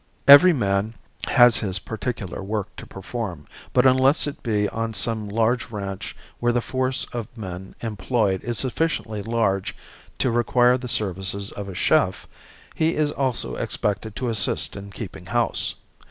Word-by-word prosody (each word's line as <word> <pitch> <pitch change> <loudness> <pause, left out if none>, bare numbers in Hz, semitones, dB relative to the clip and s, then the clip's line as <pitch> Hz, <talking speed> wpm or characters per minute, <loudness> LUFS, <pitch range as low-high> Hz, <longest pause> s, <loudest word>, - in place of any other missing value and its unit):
Every 145 +6 +10
man 105 - 0 0.3
has 120 -1 +6
his 95 -3 -1
particular 105 -1 -5
work 105 0 -4
to - - -9
perform, 95 -6 -6 0.3
but 125 0 +3
unless 130 +3 +4
it 145 - -6
be 105 -3 0
on 115 0 -3
some 110 -2 -1
large 115 +3 +1
ranch 100 -3 -5 0.2
where 120 0 +2
the 120 - +1
force 130 +2 -1
of 115 -3 -4
men 95 -3 -7
employed 105 -3 -1
is 120 -2 -2
sufficiently 130 -6 -1
large 100 -3 0 0.4
to 130 - +1
require 120 +1 +3
the 125 - -6
services 100 -3 -1
of 100 -1 -7
a 95 - -7
chef, - - +1 0.5
he 160 +1 +1
is 150 -1 +1
also 130 -4 -1
expected 105 +1 -2
to 125 -1 -2
assist 110 -2 +1
in 100 0 -8
keeping 100 - -8
house. - - +1
115 Hz, 155 wpm, -23 LUFS, 100-125 Hz, 0.5 s, Every